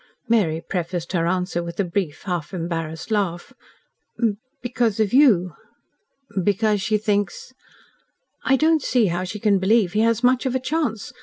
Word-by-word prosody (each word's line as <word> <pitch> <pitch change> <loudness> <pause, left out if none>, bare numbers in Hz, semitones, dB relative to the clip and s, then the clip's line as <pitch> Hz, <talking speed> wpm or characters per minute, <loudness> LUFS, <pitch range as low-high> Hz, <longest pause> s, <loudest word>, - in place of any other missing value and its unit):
Mary 190 -9 +2
prefaced 175 -2 -3
her 170 -2 +1
answer 180 -1 -1
with 170 +2 -7
a - - +3
brief, 170 -4 -3
half 180 -1 -3
embarrassed 165 +1 -4
laugh. 185 -5 -1 1.1
"Because 240 -3 -1
of 215 -1 +1
YOU." 210 - +5 0.9
"Because 205 +1 +1
she 215 +2 +1
thinks 205 +2 -2 0.5
?" - - -46 0.2
"I 270 - +3
don't 315 +3 +3
see 245 -3 +2
how 180 +1 -2
she 205 +3 -6
can 200 -2 +3
believe 195 -1 +2
he 210 - +1
has 230 +1 +2
much 255 +1 +3
of 260 - -1
a - - +2
chance. 260 -6 -2
205 Hz, 160 wpm, -22 LUFS, 175-230 Hz, 1.1 s, YOU